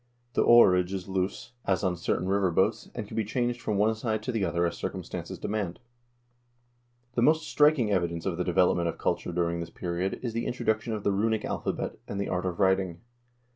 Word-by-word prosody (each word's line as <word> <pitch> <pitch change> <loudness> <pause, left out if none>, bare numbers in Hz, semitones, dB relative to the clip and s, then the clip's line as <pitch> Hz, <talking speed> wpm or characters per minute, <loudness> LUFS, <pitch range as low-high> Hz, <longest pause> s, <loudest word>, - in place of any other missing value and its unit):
The - - +2
oarage 95 -6 +6
is 95 -1 -4
loose, 95 +4 -2
as 95 -2 +1
on 90 -2 +1
certain 90 +1 -1
river 100 -1 +2
boats, 85 - +1
and - - -4
can - - -9
be 110 - +1
changed 120 +3 -1
from 105 - -1
one 105 +2 +3
side 110 -1 -2
to 125 - -2
the 115 -4 -1
other 85 -1 +1
as 85 - -1
circumstances - - -5
demand." 100 -5 -3 0.7
* 120 0 -42
The 120 - 0
most 155 +4 +3
striking 145 -7 +4
evidence 85 -3 0
of 95 -3 0
the 90 - 0
development 90 -1 +2
of 85 - -3
culture - - -1
during 85 0 0
this 85 -1 -5
period 90 +3 -3
is 120 -3 -2
the 115 +1 -2
introduction 110 -2 -1
of 105 -2 -4
the 100 - +2
runic 110 +2 0
alphabet - - -3
and 100 - -4
the 100 - -2
art 90 0 -1
of 90 -2 -4
writing. 95 -3 +2
100 Hz, 210 wpm, -28 LUFS, 90-115 Hz, 0.7 s, oarage